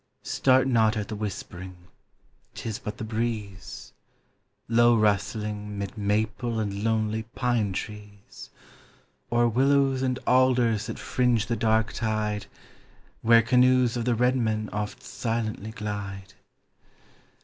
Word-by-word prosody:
Start 130 -1 +3
not 110 -3 +3
at 105 -2 -3
the 110 - -4
whispering, 95 -3 -6 0.8
'tis 110 -3 -5
but 105 - -6
the - - -5
breeze, 110 -3 -4 0.7
Low 120 0 +5
rustling, 105 0 -1
'mid 100 +1 -5
maple 110 +3 -1
and 100 -1 -3
lonely 110 -1 0
pine 120 -5 +1
trees, 105 +1 -8 0.8
Or 120 0 +3
willows 135 +2 +2
and 130 -1 0
alders 125 -4 +3
that - - -5
fringe 120 -3 +1
the 115 0 -1
dark 110 -1 +1
tide 110 -2 -2 0.7
Where 115 0 +6
canoes 125 0 +4
of 120 -1 -2
the 120 -1 +2
red 125 +3 +2
men 110 -3 -1
oft 105 0 -4
silently 115 -4 -3
glide. 100 -3 -6
110 Hz, 120 wpm, -26 LUFS, 105-120 Hz, 0.8 s, Where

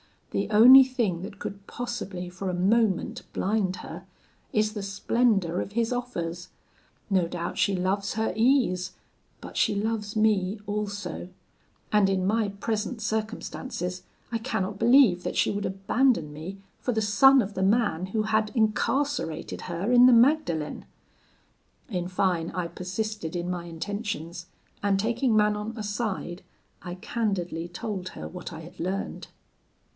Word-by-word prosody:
The - - -1
only 250 +5 +9
thing 235 -10 -1
that 200 +2 -8
could 200 0 -7
possibly 210 -7 -5
for 185 +2 -5
a - - -2
moment 200 +1 +1
blind 195 -2 0
her, 180 +3 -9 0.5
is 215 0 +2
the 210 - -4
splendour 200 -2 +1
of 200 - -7
his 230 +1 +1
offers; 175 -9 -4 0.6
no 185 -4 +2
doubt 170 0 -4
she 200 - +2
loves 195 +2 -1
her 220 0 -1
ease, 220 -7 +2 0.5
but - - -8
she 205 - +2
loves 210 0 -2
me 210 -2 +2
also; 205 -4 -4 0.6
and 210 -2 +4
in 190 -1 +1
my 215 +2 +2
present 215 +4 -3
circumstances, 215 -4 -3 0.3
I 230 - 0
cannot 205 -4 -3
believe 230 -7 +5
that - - -3
she - - +2
would 205 0 -2
abandon 195 - +1
me 165 +6 -7 0.2
for 250 - -1
the 220 - +1
son 260 +6 +6
of 205 -1 -4
the 190 - -3
man 195 -3 +2
who 215 +3 -1
had 215 0 +1
incarcerated 245 - 0
her 180 +6 -2
in 245 0 +8
the 255 - +7
Magdalen.' 230 - +2 1.0
In 180 -5 -2
fine, 180 -2 0
I 175 -1 -3
persisted 190 -1 -4
in 175 +1 -2
my 175 -1 -4
intentions, 175 -1 -5 0.3
and 200 -1 +2
taking 230 +3 +1
Manon 210 +1 +1
aside, 205 -4 -3 0.4
I 175 -1 -6
candidly 180 -5 -2
told 185 +1 -5
her - - -7
what 180 -1 -8
I 165 -1 -8
had 175 +3 -13
learned. 190 +3 -3
200 Hz, 145 wpm, -27 LUFS, 180-225 Hz, 1.0 s, only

